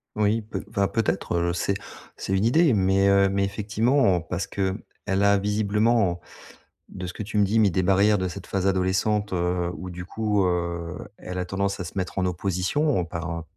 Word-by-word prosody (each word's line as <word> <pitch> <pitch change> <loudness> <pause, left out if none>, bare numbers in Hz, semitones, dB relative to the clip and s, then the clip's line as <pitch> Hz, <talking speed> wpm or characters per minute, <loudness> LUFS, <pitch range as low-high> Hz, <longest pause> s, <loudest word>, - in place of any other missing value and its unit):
Oui, 105 +2 +2
peut 110 - -6
enfin, 100 -1 +1
peut-être, 110 -5 -1
heu, 85 0 +1
c'est 100 +3 -1 0.4
c'est 95 - -4
une 95 +3 +1
idée 155 +4 +4
mais, 95 -1 +3
heu, 100 0 +4
mais 100 0 0
effectivement. 105 +1 +2
Parce 90 +3 -4
qu'elle 95 -1 -1 0.3
a 100 +1 +3
visiblement, 105 -1 +1 0.7
de 90 - -6
ce 90 - -6
que - - -5
tu 105 +1 -4
me 105 - +5
dis, 105 +3 +1
mis 105 -3 +4
des 95 +2 +1
barrières 100 +3 +4
de 95 - -1
cette 90 +1 -7
phase 95 -1 -1
adolescente, 95 +2 +1
heu, 90 0 0
ou, 90 - -7
du 90 0 -7
coup, 105 0 0
heu, 85 -1 -2 0.2
elle 90 0 -6
a 90 - -2
tendance 100 +1 -2
à - - -3
se 85 - -8
mettre 95 0 -2
en 95 - +1
opposition 90 - 0
par, 85 -1 -5
heu, 80 - -8
95 Hz, 200 wpm, -25 LUFS, 90-105 Hz, 0.7 s, me